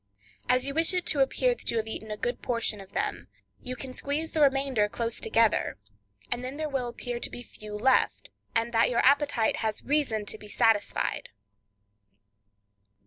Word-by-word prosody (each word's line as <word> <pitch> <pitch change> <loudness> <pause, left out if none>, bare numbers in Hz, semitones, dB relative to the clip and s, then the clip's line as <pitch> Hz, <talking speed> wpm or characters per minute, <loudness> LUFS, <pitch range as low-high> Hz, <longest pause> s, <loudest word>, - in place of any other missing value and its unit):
As 255 +1 +4
you 275 - -2
wish 325 +4 +3
it 360 - 0
to 295 - +1
appear - - +3
that - - -8
you 230 - 0
have 220 - 0
eaten 220 0 -6
a 210 - -4
good 240 +3 -2
portion 230 -4 -1
of 190 - -14
them, - - -2 0.3
you 255 0 -5
can 255 +1 -7
squeeze 295 +5 -2
the 315 - 0
remainder 270 -6 +3
close 230 +1 -3
together, 225 - +2 0.5
and 240 +1 0
then 260 +3 -5
there 310 0 -2
will 270 -4 -2
appear 240 0 -5
to - - -3
be 245 - -8
few 215 -3 -9
left, 255 +5 +2 0.2
and 230 +1 +1
that 225 0 +4
your 240 - +2
appetite 280 -4 +3
has 220 -1 -2
reason 265 -8 0
to 215 - -3
be 210 - -11
satisfied. 225 -2 +1
245 Hz, 185 wpm, -28 LUFS, 225-275 Hz, 0.5 s, As